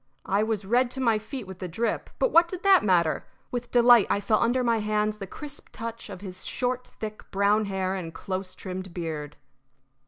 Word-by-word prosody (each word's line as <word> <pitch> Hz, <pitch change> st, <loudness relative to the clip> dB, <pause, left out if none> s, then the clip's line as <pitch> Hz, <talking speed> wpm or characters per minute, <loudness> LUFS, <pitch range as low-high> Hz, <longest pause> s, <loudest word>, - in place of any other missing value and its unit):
I 200 Hz, +2 st, +2 dB
was 215 Hz, -2 st, -1 dB
red 240 Hz, +4 st, +3 dB
to 265 Hz, -, -5 dB
my 230 Hz, -4 st, +3 dB
feet 230 Hz, +2 st, -7 dB
with 190 Hz, -1 st, -10 dB
the 185 Hz, -, -4 dB
drip, 220 Hz, +6 st, -2 dB
but -, -, +2 dB
what 335 Hz, +1 st, +6 dB
did 365 Hz, +1 st, -6 dB
that 390 Hz, -2 st, +6 dB
matter? 175 Hz, -5 st, +2 dB, 0.2 s
With 245 Hz, -1 st, -3 dB
delight 240 Hz, -3 st, +6 dB
I -, -, +2 dB
felt 215 Hz, +1 st, +2 dB
under 250 Hz, +2 st, +2 dB
my 230 Hz, -2 st, +2 dB
hands 210 Hz, 0 st, 0 dB
the 195 Hz, -, -5 dB
crisp 290 Hz, +7 st, -9 dB
touch 230 Hz, 0 st, -6 dB
of 180 Hz, -, -8 dB
his 185 Hz, -2 st, -7 dB
short, 250 Hz, 0 st, -2 dB
thick, 215 Hz, -1 st, -8 dB
brown 205 Hz, +2 st, +2 dB
hair 190 Hz, -1 st, -1 dB
and 180 Hz, -4 st, -4 dB
close 185 Hz, +2 st, -5 dB
trimmed 185 Hz, -1 st, -6 dB
beard. 155 Hz, -4 st, -4 dB
215 Hz, 205 wpm, -27 LUFS, 190-240 Hz, 0.2 s, what